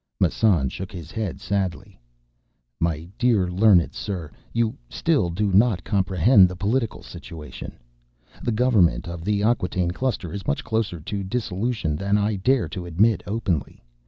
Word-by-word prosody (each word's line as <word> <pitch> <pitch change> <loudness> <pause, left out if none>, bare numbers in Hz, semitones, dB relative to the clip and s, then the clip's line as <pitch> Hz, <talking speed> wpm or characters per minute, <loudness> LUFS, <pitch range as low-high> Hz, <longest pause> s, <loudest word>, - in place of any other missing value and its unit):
Massan 90 -4 +3
shook 95 +7 -7
his 85 -5 -9
head 110 -6 -3
sadly. 95 -3 -3 0.8
"My 80 -1 -1
dear 115 -7 +3
learned 95 -2 +4
sir, 90 -8 -5 0.2
you 115 -1 0
still 150 - +1
do 95 +3 -1
not 100 -2 +4
comprehend 95 0 +4
the 90 - -6
political 110 +5 -1
situation. 80 -3 -9 0.6
The 120 - -1
Government 110 -7 +3
of 85 -1 -6
the 100 +1 0
Acquataine 90 -6 +1
Cluster 100 -6 -2
is 100 - -6
much 70 - 0
closer 110 -6 -1
to 100 +5 -4
dissolution 105 -4 -2
than 100 +6 +1
I 105 0 0
dare 125 +6 +2
to 90 -3 -6
admit 105 +7 +2
openly. 100 -7 -2
100 Hz, 145 wpm, -24 LUFS, 90-110 Hz, 0.8 s, learned